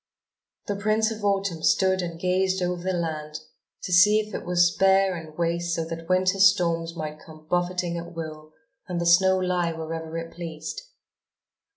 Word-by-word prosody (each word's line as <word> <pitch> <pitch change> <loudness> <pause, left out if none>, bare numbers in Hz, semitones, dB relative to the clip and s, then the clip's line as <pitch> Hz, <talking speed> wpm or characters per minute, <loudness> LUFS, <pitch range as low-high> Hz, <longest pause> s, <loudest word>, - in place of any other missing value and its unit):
The 205 - -2
Prince 215 +2 +1
of 220 -1 -7
Autumn 195 -4 0
stood 190 +2 +2
and 170 -2 -5
gazed 185 +1 +1
over 180 0 -2
the 185 +1 -1
land 155 -3 -3 0.4
to 180 - -3
see 210 +4 +6
if 215 0 -5
it - - -5
was 175 0 +3
bare 195 0 +4
and 160 -2 -10
waste 170 0 -1
so 165 - -2
that 165 +1 -7
Winter's 185 +1 +5
storms 165 -3 -2
might 155 -2 -6
come 155 -1 -15
buffeting 175 0 -1
at 170 0 -10
will 155 -1 -7 0.4
and 180 -2 -3
the 170 - -1
snow 190 +2 +5
lie 180 -2 0
wherever 160 0 -5
it 165 0 -6
pleased. 160 -2 -6
175 Hz, 175 wpm, -25 LUFS, 165-190 Hz, 0.4 s, see